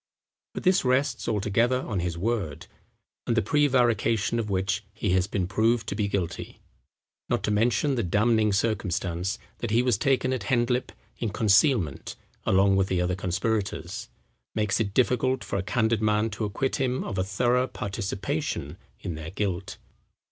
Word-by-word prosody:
But - - -4
this 185 +1 +4
rests 130 0 +1
altogether 115 +4 +1
on 100 -5 -2
his 85 -1 -2
word; 95 -7 -2 0.6
and 115 - +1
the - - +5
prevarication 120 -4 +2
of 110 -2 -3
which 95 +2 0
he 105 -2 -1
has 90 0 +2
been 100 -2 -1
proved 110 +4 +1
to - - -3
be 105 -1 0
guilty 95 -4 -3 0.7
(not - - 0
to - - 0
mention 120 +7 +2
the 125 - 0
damning 105 +3 +2
circumstance 95 -2 -1 0.2
that 120 - -3
he 115 +3 +3
was 120 -5 +2
taken 130 -1 +2
at 120 -6 -3
Hendlip 125 +2 +1 0.3
in 115 - -1
concealment 105 - +2 0.3
along 95 +1 +4
with 95 -1 +2
the 95 -2 0
other 90 +1 +1
conspirators), 95 +3 -2 0.5
makes 105 -2 +1
it 100 -2 -2
difficult 125 +1 +2
for 100 - -3
a - - 0
candid 110 +2 +1
man 105 +1 +2
to 105 +2 -3
acquit 115 +6 -1
him 130 -1 0
of 95 - -3
a - - +2
thorough 120 +6 +1
participation 100 - -3 0.2
in 90 - -4
their 80 0 -6
guilt." 95 -1 -3
105 Hz, 160 wpm, -26 LUFS, 95-120 Hz, 0.7 s, the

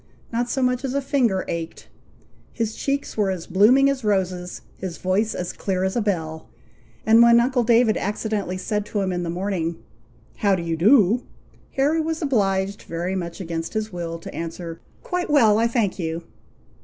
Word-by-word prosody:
Not 240 +1 0
so 265 +1 0
much 250 +1 +1
as 265 0 -2
a - - +3
finger 260 -9 +1
ached, 165 0 -5 0.6
his 225 -2 -2
cheeks 280 0 -2
were 205 -3 +1
as 185 -3 -3
blooming 245 +8 +5
as 275 -2 -1
roses, 185 -3 -1
his 185 -3 -6
voice 200 +4 0
as 180 -1 -4
clear 185 -2 -2
as 190 0 -1
a 240 - +1
bell, 160 - -3 0.6
and 225 +1 +6
when 235 0 +7
uncle 245 +1 +2
David 230 -1 +4
accidentally 205 -2 -2
said 210 +2 -2
to 205 - -2
him 190 -1 -1
in 175 - -2
the 170 - -3
morning, 175 -2 -2 0.6
"How 200 -3 +3
do 175 - -4
you 165 -1 -1
do?" 215 - +5 0.5
Harry 295 +4 +2
was 320 0 -2
obliged, 200 - 0
very 175 +3 -3
much 170 -2 -4
against 165 0 -4
his 215 -2 -2
will, 170 -1 -4
to 165 - -10
answer, 165 0 -6 0.2
"Quite 360 -2 -2
well, 225 -8 +5
I 230 - +3
thank 230 -5 0
you!" 165 0 -3
200 Hz, 180 wpm, -23 LUFS, 180-240 Hz, 0.6 s, when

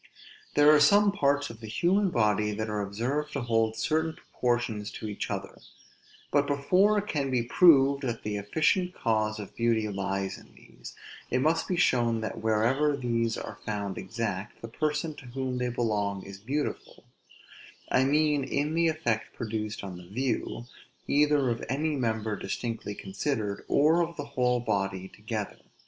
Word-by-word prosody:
There 145 +1 +7
are 150 - +6
some 200 +7 +5
parts 145 -7 +1
of 115 - -13
the 110 - -9
human 185 - +2
body 105 - +2
that 110 +1 -3
are 105 -1 -1
observed 125 +10 -2
to 140 - -2
hold 115 -2 +1
certain 160 +8 0
proportions 120 -4 -2
to 110 - -6
each 105 - -4
other; - - -5 0.7
but 145 0 +3
before 180 +9 +3
it 205 - 0
can 145 -9 -1
be 125 -2 +1
proved 140 0 +5
that 120 -4 -3
the 105 -1 -2
efficient 160 - +1
cause 110 -2 0
of 105 - -9
beauty 115 -2 +1
lies 95 -1 -3
in - - -19
these, - - -13 0.3
it 125 - +1
must 155 +5 +1
be 185 - 0
shown 120 -8 +2
that, 110 - -4
wherever 125 +7 +2
these 115 -3 0
are - - -7
found 100 -2 -3
exact, 105 -4 -4
the - - -4
person 150 +5 -2
to 135 - -11
whom 130 0 -3
they 125 0 0
belong 105 -5 -1
is 95 0 -10
beautiful: 140 +8 -4 0.9
I 130 - +4
mean 150 +1 +2
in 145 +3 -1
the 165 0 +3
effect 120 -9 -1
produced 110 -2 -4
on 95 -2 -6
the 90 -1 -12
view, 120 +2 -2 0.4
either 145 -3 +3
of 115 - -3
any 150 +4 0
member 110 -4 -1
distinctly 105 +1 -4
considered, 105 +1 -3
or 155 +4 +4
of 170 0 -3
the 145 - -4
whole 125 -3 +1
body 95 -4 -2
together. 105 -1 -5
120 Hz, 165 wpm, -28 LUFS, 110-145 Hz, 0.9 s, There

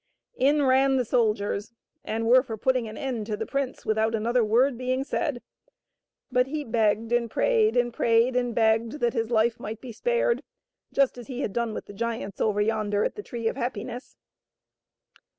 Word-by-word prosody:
In 290 +2 +3
ran 265 +1 +4
the 255 -2 +1
soldiers, 215 -2 0 0.3
and 225 +1 -2
were 250 +3 +6
for 230 -4 -6
putting 255 0 +1
an 215 - -8
end 245 -6 -3
to 210 -2 -2
the - - -3
prince 275 -2 -3
without 220 +1 +1
another 235 +2 +1
word 240 +5 +3
being 255 +2 -1
said, 280 -3 -2 0.9
but 250 +1 +3
he 300 +2 -3
begged 225 -2 +1
and 240 -1 +1
prayed 445 - +2
and 240 -1 +1
prayed 230 +3 +2
and 245 -2 0
begged 225 0 +2
that 240 -6 0
his 225 -1 -1
life 230 0 +2
might 220 +1 -6
be 250 0 -9
spared, 485 - 0 0.5
just 275 -3 +1
as 240 - -10
he 255 -1 -5
had 205 - -2
done 235 -1 -1
with - - -6
the - - -11
giants 225 -2 -4
over 210 -1 +1
yon 215 -1 0
der 205 0 +1
at - - -1
the 415 - -7
Tree 235 - -4
of - - -1
Happiness. 245 0 -5
235 Hz, 190 wpm, -26 LUFS, 220-260 Hz, 0.9 s, were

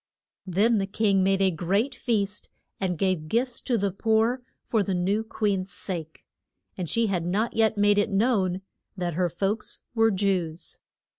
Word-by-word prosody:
Then 210 +5 +3
the 195 - -1
king 200 -1 +2
made 195 +1 +2
a 190 - +4
great 195 - 0
feast, 210 -5 -2 0.3
and 185 -3 -1
gave 185 -4 0
gifts 235 +6 -1
to 245 -3 0
the 200 -1 0
poor 225 +5 +1 0.2
for 220 - +1
the 195 -1 -1
new 195 +5 +1
queen's 200 -4 -1
sake. 165 -5 -6 0.5
And 180 -4 -4
she 230 0 +2
had 190 -5 0
not 200 +7 0
yet 220 -1 +3
made 205 0 +4
it 205 - +1
known 195 -3 +1 0.3
that 175 -2 -2
her 175 +2 +1
folks 195 +6 -2
were 225 -1 +4
Jews. 185 -5 -2
195 Hz, 165 wpm, -26 LUFS, 185-220 Hz, 0.5 s, a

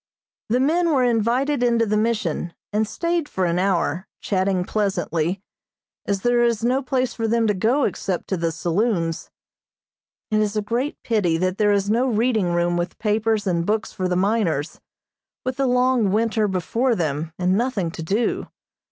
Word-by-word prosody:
The 245 +3 +2
men 335 +6 +2
were 275 -5 +3
invited 245 +4 +1
into 235 -2 +3
the 210 0 0
Mission, 210 -7 -1 0.2
and 215 +1 +1
stayed 335 +3 -1
for 185 - -1
an 170 0 +1
hour, 185 -2 0
chatting 185 -2 0
pleasantly, 190 -3 -1 0.6
as 200 -1 0
there 240 +1 +3
is 235 -2 +1
no 255 +3 +2
place 255 -2 -1
for 225 -1 -2
them 230 +1 +2
to 210 - +2
go 230 +9 +1
except 190 -3 -2
to 190 - +1
the 165 -1 -1
saloons. 170 -1 -1 1.0
It 215 - +3
is 210 0 0
a - - +2
great 240 +7 -2
pity 195 -8 +1
that 185 +3 -1
there 210 -1 +4
is 200 0 +1
no 240 +4 +2
reading 220 -5 +1
room 175 0 +1
with 175 +1 -3
papers 215 0 0
and 170 -3 +1
books 215 +4 -1
for 185 - -2
the 180 - 0
miners, 185 -6 0 0.6
with 255 0 -2
the 275 -1 +1
long 250 -4 +2
winter 220 0 +1
before 225 +7 0
them, 155 -2 -2
and 180 +1 +1
nothing 210 -7 0
to 165 - -7
do. 200 +9 -1
210 Hz, 175 wpm, -22 LUFS, 185-240 Hz, 1.0 s, there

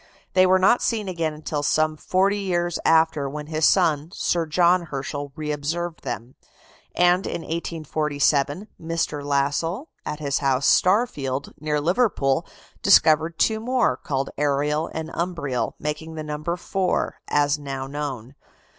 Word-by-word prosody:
They 185 0 +5
were 185 +1 +5
not 195 +6 +4
seen 220 -4 -1
again 165 -4 -2
till 150 -1 -2
some 155 +1 +1
forty 195 +6 +1
years 175 -3 -1
after, 160 -3 +3
when 150 +1 -6
his 155 0 +2
son, 160 -5 +2
Sir 170 -2 0
John 175 +2 +3
Herschel, 145 0 -5
reobserved 155 +3 -3
them. 120 -1 -5 0.6
And 180 +2 +3
in - - -3
1847, 155 0 -1
Mr. 165 -3 -2
Lassell, 145 - -1
at 150 - -4
his 140 -2 -1
house, 135 -1 +1
"Starfield," 145 - +2
near 150 0 -1
Liverpool, 165 - +1 0.3
discovered 160 -4 +4
two 220 -1 +2
more, 245 +1 +1
called 135 -1 -3
Ariel 150 +2 +1
and 160 0 -5
Umbriel, 170 -8 -2
making 155 +2 -5
the 155 - -5
number 150 +3 -3
four, 185 +1 -1
as 145 0 +2
now 135 -2 -5
known. 135 -3 -5
155 Hz, 135 wpm, -23 LUFS, 145-175 Hz, 0.6 s, They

